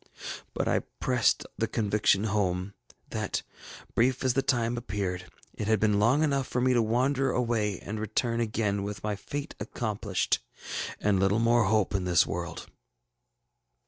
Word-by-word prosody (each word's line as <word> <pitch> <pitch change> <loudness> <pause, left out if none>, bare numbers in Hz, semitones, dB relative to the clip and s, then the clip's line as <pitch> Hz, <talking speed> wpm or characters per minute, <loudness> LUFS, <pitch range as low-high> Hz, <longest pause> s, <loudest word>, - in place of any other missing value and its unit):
But - - 0
I - - +3 0.2
pressed 125 -4 +2
the - - +1
conviction 105 -2 +2
home, 100 -3 0 0.4
that, - - -2 0.5
brief 125 +3 +2
as 130 -2 +3
the 135 - +2
time 120 -3 +1
appeared, 95 -5 -3 0.2
it 105 - -4
had 110 -2 +3
been 105 -1 +3
long 125 +8 +4
enough 140 -3 +1
for 125 - -1
me 130 +1 +3
to 120 - +4
wander 130 +5 +2
away 115 -6 0
and 110 +1 -5
return 115 +2 0
again, 105 -3 0
with 100 0 -5
my 105 -1 -1
fate 145 +9 -5
accomplished, 105 -2 -1 0.6
and 100 -2 +2
little 95 +2 +3
more 115 0 +4
hope 105 0 +2
in 95 -2 0
this 90 -3 +4
world. - - -4
110 Hz, 155 wpm, -28 LUFS, 100-120 Hz, 0.6 s, long